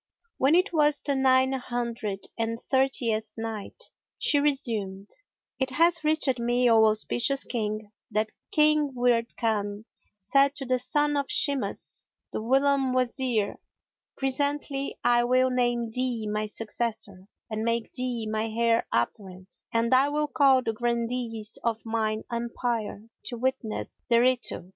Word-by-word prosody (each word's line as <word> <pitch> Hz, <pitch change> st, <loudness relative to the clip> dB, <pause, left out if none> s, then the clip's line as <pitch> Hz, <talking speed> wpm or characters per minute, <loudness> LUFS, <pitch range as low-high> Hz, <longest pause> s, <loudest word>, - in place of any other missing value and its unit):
When 275 Hz, +5 st, +4 dB
it 365 Hz, +1 st, +2 dB
was 295 Hz, -2 st, +3 dB
the 285 Hz, -, -1 dB
Nine 260 Hz, 0 st, +4 dB
Hundred 235 Hz, -5 st, -4 dB
and 230 Hz, 0 st, -2 dB
Thirtieth 235 Hz, -6 st, 0 dB
Night, 225 Hz, -, -6 dB, 0.3 s
She 290 Hz, -, +3 dB
resumed: 220 Hz, -9 st, -1 dB, 0.5 s
It 265 Hz, -1 st, 0 dB
hath 335 Hz, +5 st, +2 dB
reached 300 Hz, -5 st, +2 dB
me, 240 Hz, +1 st, +2 dB
O 220 Hz, -1 st, +6 dB
auspicious 235 Hz, +5 st, +3 dB
King, 215 Hz, -2 st, -3 dB, 0.2 s
that 215 Hz, 0 st, -1 dB, 0.2 s
King 300 Hz, -3 st, +3 dB
Wird 240 Hz, -1 st, +1 dB
Khan 210 Hz, -2 st, -1 dB, 0.3 s
said 275 Hz, +8 st, +2 dB
to 275 Hz, -, -5 dB
the 255 Hz, 0 st, +1 dB
son 295 Hz, +4 st, 0 dB
of 280 Hz, -1 st, -2 dB
Shimas 280 Hz, -3 st, +1 dB, 0.3 s
the -, -, -2 dB
whilome 270 Hz, +2 st, +2 dB
Wazir, 250 Hz, -4 st, 0 dB, 0.6 s
"Presently 280 Hz, +1 st, -1 dB
I 240 Hz, 0 st, +4 dB
will 255 Hz, +1 st, +3 dB
name 240 Hz, -2 st, 0 dB
thee 245 Hz, -2 st, -2 dB
my 210 Hz, 0 st, -2 dB
successor 210 Hz, -3 st, -2 dB, 0.2 s
and 215 Hz, 0 st, -2 dB
make 230 Hz, 0 st, -1 dB
thee 250 Hz, -3 st, -2 dB
my 215 Hz, +1 st, -1 dB
heir 230 Hz, +1 st, +1 dB
apparent, 185 Hz, -, -3 dB, 0.2 s
and 230 Hz, +1 st, +1 dB
I 265 Hz, +2 st, +5 dB
will 300 Hz, +1 st, 0 dB
call 270 Hz, -3 st, +4 dB
the 225 Hz, -, -1 dB
Grandees 235 Hz, -1 st, -3 dB
of 230 Hz, -1 st, -2 dB
mine 220 Hz, -1 st, -1 dB
Empire 235 Hz, -3 st, -3 dB, 0.2 s
to 240 Hz, -, -3 dB
witness 245 Hz, -3 st, -3 dB
thereto." 245 Hz, -4 st, +2 dB
240 Hz, 135 wpm, -27 LUFS, 220-265 Hz, 0.6 s, O